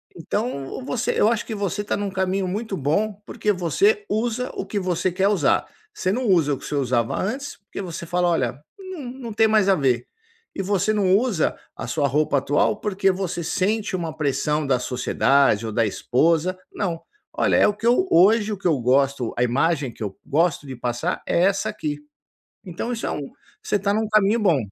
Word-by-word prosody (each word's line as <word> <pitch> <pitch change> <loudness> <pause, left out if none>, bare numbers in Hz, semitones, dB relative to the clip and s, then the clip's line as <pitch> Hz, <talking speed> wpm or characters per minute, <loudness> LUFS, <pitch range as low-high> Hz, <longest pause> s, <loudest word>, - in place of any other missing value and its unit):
Então, 205 - -4
você 250 -3 -1
eu - - +4
acho 230 0 0
que 225 - -5
você 200 0 -2
está 205 - -2
num 205 0 -2
caminho 190 0 -1
muito 205 +2 -3
bom, 195 +9 0
porque 210 - -1
você 395 - +1
usa 240 +3 -1
o - - -4
que 200 +1 -2
você 185 -1 0
quer 190 +2 +1
usar, 205 -2 +2 0.3
você 190 - -1
não 245 +4 -1
usa 165 -7 +3
o - - -2
que - - -11
você - - -3
usava 125 -4 0
antes, 265 +9 -3
porque 200 0 -8
você 170 -3 -6
fala: 175 +1 +1
“Olha, 130 -6 0 0.2
não 375 -4 -8 0.2
não 230 - -5
tem 220 +1 +4
mais 215 -2 +3
a 195 - +5
ver. 130 -6 +1 0.5
E - - -2
você 200 +2 +1
não 195 -3 +3
usa 220 -8 0 0.2
a - - -6
sua 145 -3 +1
roupa 145 +1 +1
atual, 145 +8 +1
porque 195 -2 +1
você 185 -2 -3
sente 205 +6 -1
uma 165 -3 -4
pressão 150 0 0
da 130 -2 +2
sociedade 130 -2 +2
ou 110 - -3
da 115 +1 +2
esposa. 165 - +1
Não: 170 -5 -3 0.3
“Olha - - +2
é - - +5
o 210 - +1
que 225 +3 -3
eu 250 +11 +3
hoje 210 +4 +5
o - - -5
que 185 - -2
eu 155 -6 +2
gosto 130 0 +1
a 120 - +2
imagem 140 +2 +1
que 110 - -8
eu 100 -2 -4
gosto 155 0 +1
de 130 - -6
passar 120 0 -2
é 170 - +2
essa 200 +2 +1
aqui. 150 -8 -4 0.7
Então 185 +7 -4
isso 230 - -3
é - - -1
um 140 -2 -5 0.3
você - - -1
está 200 0 0
num 220 +1 0
caminho 215 +1 +3
bom. 190 -8 +3
185 Hz, 205 wpm, -23 LUFS, 145-210 Hz, 0.7 s, a